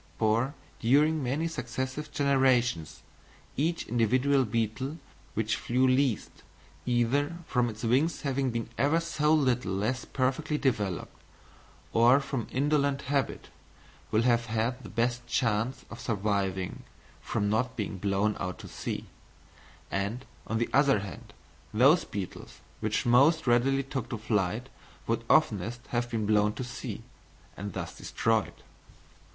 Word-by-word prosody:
For 115 +5 +1 0.2
during 150 +6 +3
many 140 +6 0
successive 130 -1 -4
generations 130 - +2 0.5
each 165 +5 0
individual 130 +4 +2
beetle 115 +6 -2 0.4
which 110 0 0
flew 125 +2 +1
least, 130 -3 +1 0.5
either 130 +7 +1
from 125 -5 +1
its 110 +1 -8
wings 130 +9 +2
having 135 -2 0
been 115 -1 -3
ever 145 +6 +3
so 155 -2 0
little 130 -8 +2
less 110 +7 -1
perfectly 140 +4 0
developed 105 - -1 0.8
or 120 +4 +6
from 135 -4 -3
indolent 140 0 +1
habit, 140 -2 -1 0.6
will 110 +1 +2
have 120 -1 +2
had 115 +3 -1
the - - -10
best 120 +1 -1
chance 115 +1 0
of 115 - -8
surviving 100 -4 -1 0.4
from 100 - -1
not 125 +5 0
being 105 -4 -4
blown 100 +2 +1
out 90 -1 -3
to - - -10
sea; - - -5 0.9
and, 100 +6 -2 0.2
on 115 - -1
the 115 - 0
other 140 -6 +4
hand, 95 -7 -9 0.4
those 140 +9 +5
beetles 95 -5 -7 0.2
which 110 0 -1
most 140 +7 +5
readily 135 +3 +3
took 130 -3 -4
to 120 - -3
flight 105 +2 -1 0.4
would 115 0 -1
oftenest 115 - +2
have 120 0 -1
been 115 -2 -1
blown 105 0 +3
to 130 - -5
sea, 120 -1 -6 0.5
and 100 0 -6
thus - - -5
destroyed. - - -1
120 Hz, 135 wpm, -29 LUFS, 110-135 Hz, 0.9 s, or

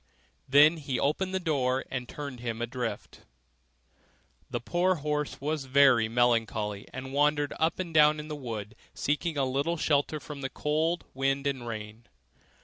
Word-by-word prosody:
Then 150 +4 +7
he 140 -4 -3
opened 185 +6 0
the 190 - 0
door 135 -6 0
and 125 -2 -4
turned 140 -4 -6
him 115 -1 -4
adrift. 120 0 -4 1.3
The - - -2
poor 180 +7 +1
horse 150 -1 -2
was 150 0 -2
very 130 -4 +5
melancholy, 115 -4 +1
and 130 +1 -7
wandered 145 0 +2
up 160 +1 +1
and 175 -3 -4
down 150 0 +5
in 150 - -7
the 155 - -4
wood, 110 -6 -6 0.2
seeking 150 +3 -1
some 135 -2 +1
little 140 +6 0
shelter 150 0 +1
from 145 -1 -8
the 135 - -3
cold 160 +5 0
wind 135 +1 0
and 135 -4 -2
rain. 110 +1 -7
140 Hz, 155 wpm, -29 LUFS, 125-150 Hz, 1.3 s, Then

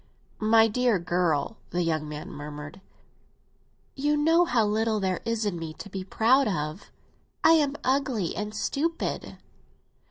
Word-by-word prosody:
"My 225 +1 +5
dear 240 -1 +2
girl!" 175 +2 0
the 175 0 -1
young 155 -2 -1
man 150 0 -7
murmured. 150 +4 -8 1.1
"You 295 +2 0
know 325 +4 +4
how 240 -7 +2
little 220 +1 +1
there 190 -2 -1
is 230 -1 -1
in 185 -5 -2
me 160 -1 -6
to 205 - -10
be 190 -1 -4
proud 245 +8 +3
of. 155 -1 -3 0.5
I - - +7
am 295 -3 +3
ugly 260 -9 0
and 210 0 -4
stupid." 295 +11 -2
210 Hz, 145 wpm, -27 LUFS, 175-255 Hz, 1.1 s, I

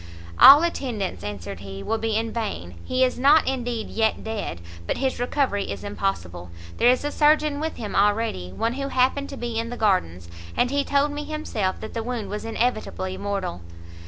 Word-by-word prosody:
"All 290 +4 +10
attendance," 245 - -2
answered 100 -2 -6
he, 95 0 -8
"will 225 - -1
be 225 -1 -1
in 225 +1 -1
vain; 200 - -4
he 255 0 +1
is 250 -1 +1
not 290 +4 +5
indeed, 245 -4 -2
yet 220 -1 0
dead, 210 - -4 0.3
but - - -1
his 265 -2 -1
recovery 245 -4 0
is 100 -2 -5
impossible. 90 -2 -3 0.3
There 240 - +5
is 250 +2 +3
a 290 - -1
surgeon 300 -1 +3
with 320 +1 -3
him 210 -3 -6
already; 205 - +1
one 230 - -1
who 275 +1 -3
happened 265 +2 +1
to 275 - -7
be 235 -2 -3
in 230 0 -3
the 245 - -6
gardens, 90 - 0 0.3
and 250 - +2
he 285 0 +1
told 285 +1 +1
me 295 0 -4
himself 230 -12 -2
that 220 - -7
the 230 - -2
wound 225 -3 -4
was 210 +2 -4
inevitably 225 -5 -2
mortal." 195 - -3
225 Hz, 190 wpm, -24 LUFS, 190-265 Hz, 0.3 s, All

